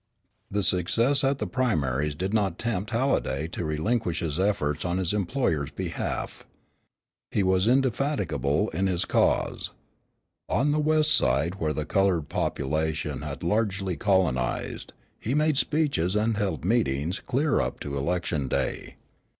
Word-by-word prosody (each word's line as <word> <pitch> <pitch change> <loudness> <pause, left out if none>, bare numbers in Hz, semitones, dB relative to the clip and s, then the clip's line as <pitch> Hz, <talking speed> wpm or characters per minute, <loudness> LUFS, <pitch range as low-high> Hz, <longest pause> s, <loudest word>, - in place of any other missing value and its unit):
The 100 0 0
success 115 +10 +2
at 135 0 +2
the - - -2
primaries 75 - 0
did 95 +6 -3
not 100 -5 +1
tempt 105 -4 -2
Halliday 115 - 0
to 90 - -4
relinquish 85 +4 -1
his 80 0 -2
efforts 75 -7 0
on 90 0 -1
his 95 0 0
employer's 90 - 0
behalf. - - -4 0.9
He 100 - +1
was 95 +2 +2
indefatigable 125 - +1
in 95 +4 0
his 90 -2 0
cause. - - +1 0.8
On 135 +10 +2
the 150 - +1
west 155 0 +3
side 85 +4 +2
where 80 -1 0
the 75 -1 -3
colored 90 -4 +1
population 75 0 -1
had 75 0 -6
largely 95 -1 0
colonized, 85 - 0 0.3
he 125 +6 -2
made 155 0 +3
speeches 140 - +1
and 110 +1 +2
held 95 -7 -2
meetings 90 - +1
clear 140 +2 +1
up 60 0 -3
to 70 -1 -4
election 75 -1 -1
day. - - -2
95 Hz, 140 wpm, -26 LUFS, 75-115 Hz, 0.9 s, west